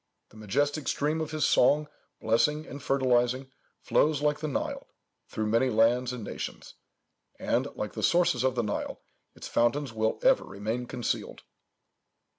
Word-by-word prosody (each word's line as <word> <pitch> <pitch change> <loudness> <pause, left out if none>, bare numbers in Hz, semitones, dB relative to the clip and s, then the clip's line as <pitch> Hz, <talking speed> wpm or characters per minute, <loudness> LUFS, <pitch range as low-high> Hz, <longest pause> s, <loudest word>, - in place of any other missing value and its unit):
The - - -20
majestic 145 +8 -1
stream 155 +3 0
of 155 - -3
his 155 -1 0
song, 150 +4 +4 0.3
blessing 150 +8 +1
and 140 - -9
fertilizing, 130 -1 +1 0.3
flows 150 -1 +2
like 150 0 +1
the 155 - -3
Nile, 145 - -3 0.4
through 110 - -3
many 115 +4 +2
lands 120 +2 +3
and 125 -3 -6
nations; - - -7 0.6
and, - - 0
like - - -4
the - - -5
sources 175 -5 +3
of 130 -1 +1
the 120 - 0
Nile, 105 - -3 0.4
its - - -8
fountains 130 +2 +1
will 110 0 0
ever - - +4
remain 110 +5 -4
concealed." 120 - -3
130 Hz, 150 wpm, -28 LUFS, 115-150 Hz, 0.6 s, song